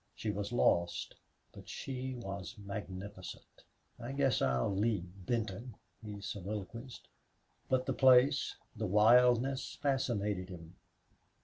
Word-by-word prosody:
She 110 - -2
was 100 +1 -3
lost, 85 -7 +2 0.4
but - - -12
she 130 -1 -4
was 100 -3 -6
magnificent. 100 -1 -8 0.4
"I 120 +3 -5
guess 135 -4 +2
I'll 65 +8 +1
leave 105 -2 +1 0.2
Benton," 115 0 -2 0.3
he 105 -1 -6
soliloquized. 105 +5 -6 0.6
But 130 -1 +2
the - - 0
place, 130 +2 +5 0.2
the 110 - -2
wildness, 125 +6 +4
fascinated 105 -9 0
him. 85 -1 -10
110 Hz, 110 wpm, -34 LUFS, 100-125 Hz, 0.6 s, place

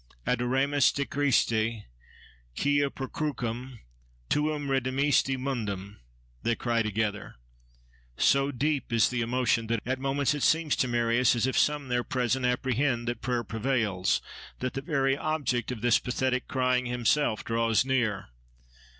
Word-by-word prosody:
Adoramus 130 +3 +2
te 140 - -2
Christe, 115 -6 +1 0.7
quia 145 - +2
per 135 -1 -6
crucem 125 -4 -4 0.5
tuam 150 -1 0
redemisti 135 +1 +1
mundum!—they 100 - -5
cry 115 0 0
together. 110 -1 -2 0.8
So 140 +1 +3
deep 140 +1 -1
is 115 -2 +3
the 125 -1 -2
emotion 120 -1 +1
that 115 0 0
at 130 +2 -2
moments 135 +1 0
it 145 - -4
seems 160 0 +2
to 130 - +1
Marius 120 0 +2
as 120 - +1
if 130 - -1
some 150 -2 +1
there 125 0 +1
present 125 0 0
apprehend 125 0 0
that 120 -2 -4
prayer 120 -2 -1
prevails, 110 -5 0 0.3
that 130 0 -3
the 135 - -3
very 135 -3 +1
object 135 -6 -1
of 120 -4 -6
this 120 -1 +4
pathetic 130 +1 -1
crying 125 -1 +1
himself 120 0 +1
draws 115 +1 +1
near. 120 - 0
125 Hz, 135 wpm, -28 LUFS, 115-135 Hz, 0.8 s, this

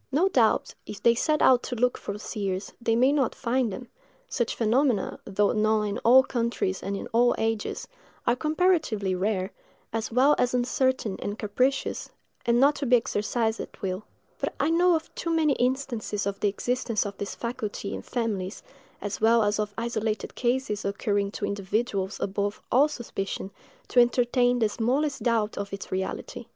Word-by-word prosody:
No 330 +8 +3
doubt, 235 - +2
if 205 - -8
they 235 - +6
set 305 +6 +1
out 250 -2 +6
to 250 - -4
look 245 +1 +2
for 200 - -5
seers, 200 -2 -4
they 225 -1 +2
may 255 +4 +4
not 280 -5 +1
find 245 -1 0
them; 245 +6 -7 0.4
such 235 -2 -1
phenomena, 235 -1 +1
though 205 +1 +1
known 215 0 +2
in 205 -1 -2
all 255 +3 +7
countries 235 -7 -1
and 200 0 -3
in - - -6
all 240 +1 +4
ages, 225 -1 -2 0.4
are 240 - +3
comparatively 305 - +1
rare, 190 +1 -1 0.4
as 225 0 -2
well 260 +5 +5
as 250 0 +2
uncertain 250 -3 0
and 205 +1 -3
capricious, 250 +6 -1 0.4
and 235 0 +4
not 280 +3 +5
to 280 - -2
be 250 - +6
exercised 225 -1 0
at - - -8
will: 190 +1 -2 0.4
but - - -2
I 295 +4 +2
know 350 +1 +4
of 320 - -4
too 335 - -4
many 320 -3 +3
instances 245 -5 -1
of 200 0 -3
the 205 - +2
existence 235 +1 -1
of 200 -1 -5
this 200 - -4
faculty 215 -4 -4
in - - -5
families, 210 -5 -3 0.4
as 205 - -4
well 230 0 +5
as 205 0 +1
of 210 0 -1
isolated 225 -2 -2
cases 240 -4 -1
occurring 200 0 0
to 205 - -3
individuals 200 0 -2
above 200 +1 -2
all 275 +5 +5
suspicion, 200 -8 -5 0.4
to 250 - +4
entertain 245 0 +3
the 220 -3 +2
smallest 270 +7 0
doubt 225 -4 0
of 200 0 -4
its 200 0 -7
reality. 190 - -4
230 Hz, 175 wpm, -26 LUFS, 205-255 Hz, 0.4 s, all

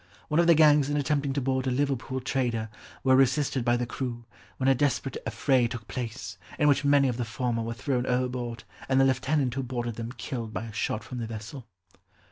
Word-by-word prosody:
One 150 +2 +2
of 170 - +4
the 170 - +7
gangs 150 -2 +5
in 145 - 0
attempting 145 -1 0
to 140 - -1
board 130 0 0
a - - +3
Liverpool 130 0 -1
trader, 120 -4 -1 0.3
were 130 -1 +5
resisted 135 0 +2
by 120 0 +2
the 120 - -1
crew, 120 -1 -5 0.3
when 130 - 0
a 135 - +6
desperate 135 0 0
affray 120 +2 +2
took 115 -2 -7
place, 120 0 -5 0.2
in 150 - +3
which 145 0 +3
many 140 -1 +4
of 125 -2 -1
the 125 - -1
former 115 0 -2
were 115 +1 -4
thrown 125 +3 -1
overboard, 125 -2 -2 0.3
and 130 0 +4
the 135 - +6
lieutenant 130 0 +1
who 135 - -2
boarded 120 -3 -4
them 115 0 -4
killed 115 -2 -5
by 95 - -3
a 110 - -9
shot 105 0 -2
from 120 +5 -7
the 115 - -3
vessel." 115 +3 -8
130 Hz, 215 wpm, -27 LUFS, 120-135 Hz, 0.3 s, the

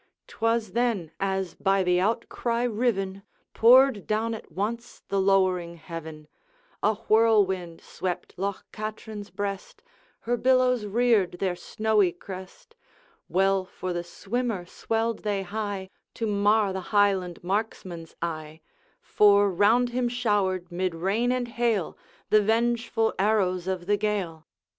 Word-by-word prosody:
'T - - -16
was 225 -2 +1
then, 225 -8 0
as 190 -2 -1
by 195 -1 +1
the 180 0 +2
outcry 230 +3 -1
riven, 210 -5 -1 0.3
Poured 250 -2 +5
down 220 +2 0
at 220 - -9
once 225 +7 -4
the 195 -1 +1
lowering 185 -3 +2
heaven: 160 -2 -8 0.5
A 215 +1 +2
whirlwind 200 -6 +3
swept 180 -2 -5
Loch 195 +1 -3
Katrine's 215 -1 -6
breast, 200 -1 -5 0.4
Her 240 +1 -1
billows 250 -3 +3
reared 215 -4 +2
their 180 0 -2
snowy 210 +1 +1
crest. 185 -1 -11 0.5
Well 195 0 +2
for 185 0 -5
the 175 0 -3
swimmer 210 +2 -3
swelled 225 +4 -2
they 205 -2 -2
high, 200 -1 -4 0.2
To 230 - -2
mar 205 -1 +2
the 190 - -3
Highland 195 -5 +1
marksman's 185 -4 -3
eye; 155 -1 -5 0.4
For 205 -1 +4
round 220 +7 +3
him 245 0 0
showered, 200 -7 0
mid 180 0 -2
rain 200 +8 0
and 250 -1 -1
hail, 230 -6 -1 0.4
The 215 - +6
vengeful 225 +1 +1
arrows 190 -3 +1
of 185 -2 -2
the 205 +2 +2
Gael. 195 -7 -2
200 Hz, 130 wpm, -26 LUFS, 185-225 Hz, 0.5 s, The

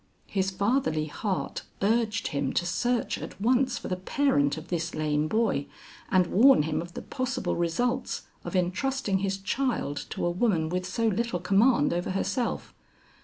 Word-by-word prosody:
His 195 -1 0
fatherly 200 - +1
heart 190 +5 -3 0.2
urged 225 +2 +1
him 140 -2 -1
to 175 - +1
search 240 +7 0
at - - -8
once 250 +3 +2
for - - -6
the 185 - -1
parent 180 - +1
of 160 +2 -9
this 170 -1 -2
lame 150 0 0
boy, 215 -8 +1 0.4
and 185 -1 +4
warn 225 - +6
him 155 +1 -1
of 170 0 -10
the - - -5
possible 255 -1 -2
results 240 +10 -1 0.2
of - - -5
entrusting 195 +4 0
his 195 0 -1
child 200 - -1
to - - -3
a 175 - +1
woman 175 -4 +1
with 180 +1 -2
so 230 +5 -1
little 225 -2 0
command 195 - +3
over 175 +1 -2
herself. 230 +6 -2
195 Hz, 165 wpm, -27 LUFS, 170-240 Hz, 0.4 s, warn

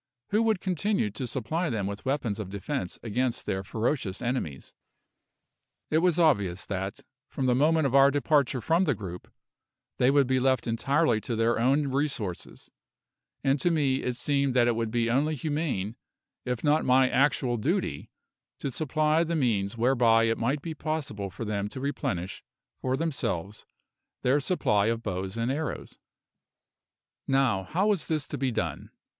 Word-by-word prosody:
Who 210 +2 +2
would 220 -4 +1
continue 185 - 0
to 125 +5 -5
supply 155 +8 -2
them 110 -5 -1
with 100 +4 -5
weapons 130 -7 -1
of 100 -3 -5
defence 95 -2 -4
against 120 +2 -1
their 95 -2 -2
ferocious 110 -1 -2
enemies? 120 - -3 1.2
It 155 - +4
was 175 -1 +2
obvious 100 - +2
that, 95 0 -4 0.3
from 135 - -3
the 125 - +3
moment 155 +4 +3
of 135 - 0
our 135 0 +7
departure 145 -2 +1
from 165 +7 +2
the 145 -6 +1
group, 90 -4 -8 0.7
they 125 - +4
would 140 0 +4
be 130 +1 +1
left 130 0 +2
entirely 120 +1 +1
to 115 - -3
their 115 +1 +2
own 135 +4 +2
resources; 130 - -3 0.7
and 135 +1 +2
to 175 - +2
me 145 -5 +2
it 125 - -2
seemed 140 0 0
that 120 -1 +4
it 120 - +2
would 115 -1 -1
be 115 0 0
only 145 +6 +1
humane, 145 - -2 0.5
if 125 -2 -3
not 150 +1 +3
my 130 +1 +4
actual 130 -3 +2
duty, 105 - -1 0.5
to 140 - -4
supply 155 +3 +1
the 170 0 -2
means 115 -7 0
whereby 115 -2 +4
it 115 0 +1
might 135 +5 0
be 165 - -4
possible 150 -11 -3
for 115 - -6
them 105 -1 -2
to 130 - -7
replenish 95 -10 -3 0.4
for 130 0 0
themselves 115 - -3 0.6
their 130 +4 +3
supply 110 - +1
of 115 0 -1
bows 95 +3 -3
and 115 +2 0
arrows. 150 +3 -4 1.3
Now, 130 -8 +2
how 180 - 0
was 205 -5 +1
this 155 -2 -1
to 145 - -4
be 135 -1 +1
done? - - -3
130 Hz, 165 wpm, -28 LUFS, 110-150 Hz, 1.3 s, our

